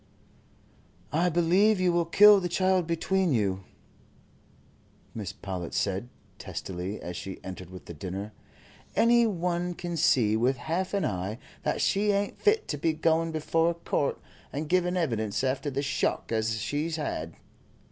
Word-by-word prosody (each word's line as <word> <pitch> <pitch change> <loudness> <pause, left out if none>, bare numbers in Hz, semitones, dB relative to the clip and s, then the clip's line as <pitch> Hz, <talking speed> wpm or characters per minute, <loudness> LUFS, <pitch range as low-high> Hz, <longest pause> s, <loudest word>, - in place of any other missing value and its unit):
"I 170 +4 +3
believe 180 +5 +3
you 180 -1 +3
will 170 -1 +2
kill 205 +3 +8
the 180 -2 -3
child 185 -1 +2
between 175 0 +1
you," 95 -3 -1 1.5
Mrs. 105 -5 -5
Powlett 90 -3 -4
said, 100 +4 -1 0.3
testily, 95 +2 -5
as 90 0 -6
she 95 +1 -6
entered 95 -1 -8
with 90 0 -11
the 85 - -8
dinner. 95 +6 -6 0.6
"Any 235 0 +5
one 175 -2 -1
can 175 0 -4
see 120 -9 +3
with 125 +4 +2
half 175 +9 -2
an 200 - +1
eye 95 +3 -3 0.2
that - - -1
she 205 +1 +2
ain't 200 0 -1
fit 425 +1 +3
to 145 - -2
be 160 +2 +1
going 165 +1 +1
before 165 +1 +1
a 170 - -2
court 155 -4 -1 0.3
and 150 +2 -4
giving 180 +1 +1
evidence 115 - -1
after 135 +2 0
the 140 +1 -2
shock 135 -3 -1
as 110 0 0
she 145 +8 -1
'as 165 - -3
had. 85 - -4
155 Hz, 155 wpm, -28 LUFS, 105-180 Hz, 1.5 s, kill